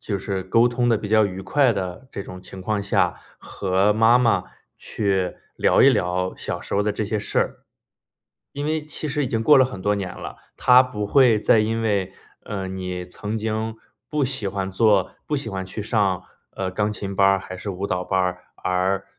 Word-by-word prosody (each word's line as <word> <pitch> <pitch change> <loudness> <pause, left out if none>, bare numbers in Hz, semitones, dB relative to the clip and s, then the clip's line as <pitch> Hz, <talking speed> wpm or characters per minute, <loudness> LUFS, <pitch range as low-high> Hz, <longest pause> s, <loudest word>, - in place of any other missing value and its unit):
就 100 -3 -3
是 95 0 -3
沟 115 +6 +3
通 120 0 0
得 115 - +4
比 105 0 -5
较 110 0 +5
愉 95 -1 -6
快 135 +6 +3
的 95 +5 -5
这 100 - -5
种 90 -1 -10
情 95 - -10
况 105 +2 -1
下， 100 - +1 0.2
和 95 +1 +1
妈 115 +3 +5
妈 115 -7 +2 0.3
去 95 -3 -1 0.2
聊 - - +4
一 - - +8
聊 90 +1 0
小 - - -4
时 - - -5
候 100 - +2
的 105 - 0
这 105 - -2
些 105 +1 -2
事 105 - -2
儿。 - - 0 1.0
因 145 - -4
为 155 0 -1
其 155 +1 -5
实 145 0 -1
已 - - -3
经 115 -1 -1
过 150 - +7
了 130 - +6
很 130 -7 -6
多 105 +1 +2
年 95 -3 -4
了， - - -8 0.2
她 125 +1 +6
不 105 -5 -4
会 125 -2 +5
再 110 +1 +4
因 115 +1 -1
为， 100 -4 0 0.3
呃， 100 -2 -4
你 90 -1 -5
曾 105 +5 -5
经 110 +1 -2 0.3
不 150 -2 0
喜 130 -6 -2
欢 95 0 -3
做 100 -2 +2
不 150 - -1
喜 135 -5 -4
欢 95 -1 -4
去 95 +3 -7
上， 100 -4 0 0.3
呃， 95 - -3
钢 105 +3 -1
琴 100 -2 -5
班 95 - +3
儿 95 0 +4
还 95 -1 -8
是 100 - -5
舞 95 +1 -4
蹈 90 -2 -1
班 95 - 0
儿 90 0 -2
而 95 +1 0
105 Hz, 230 characters per minute, -23 LUFS, 95-115 Hz, 1.0 s, 一